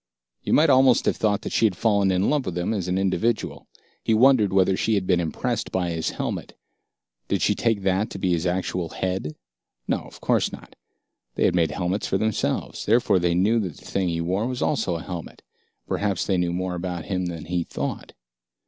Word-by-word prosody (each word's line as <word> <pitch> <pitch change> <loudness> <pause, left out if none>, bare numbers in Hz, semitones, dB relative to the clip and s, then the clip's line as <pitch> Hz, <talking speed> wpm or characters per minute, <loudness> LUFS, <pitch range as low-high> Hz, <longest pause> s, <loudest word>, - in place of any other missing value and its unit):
You - - -4
might 155 -1 +5
almost 130 -1 +5
have - - +2
thought 105 -2 +1
that - - -4
she 115 - +4
had 95 -4 -4
fallen 100 -3 +2
in 95 +1 +2
love 145 -3 +1
with 90 - -3
him 90 +5 -1
as 95 -5 -2
an 90 +1 0
individual. 95 +4 -1 0.4
He 110 - +2
wondered 120 -4 +5
whether 95 0 +3
she 110 +3 +1
had 95 -2 0
been 90 -2 +2
impressed 85 -2 -2
by 90 -2 -1
his 80 -1 -1
helmet. - - -4 0.7
Did - - 0
she - - +3
take 110 -4 0
that 95 +2 +1
to - - -7
be 95 -1 0
his 85 +1 0
actual 90 -1 -2
head? 90 -5 -3 0.5
No, - - +1
of - - -13
course - - +1
not. - - -11 0.6
They - - +2
had - - +3
made 85 -2 +2
helmets 90 +3 -2
for 95 - +1
themselves, 110 +1 -2
therefore 110 -3 +4
they 85 -1 +1
knew 105 +6 +3
that 90 -8 -4
the - - -16
thing 95 -2 -1
he 85 0 -1
wore 95 +7 -1
was 125 -1 -2
also 110 - 0
a 80 - -5
helmet. 90 -3 -7 0.4
Perhaps 100 -3 -1
they 95 - +1
knew 90 -1 0
more 90 +1 -2
about 90 -2 -4
him 90 -2 -2
than 85 -3 -6
he 85 +1 -1
thought. - - -5
95 Hz, 210 wpm, -24 LUFS, 90-105 Hz, 0.7 s, might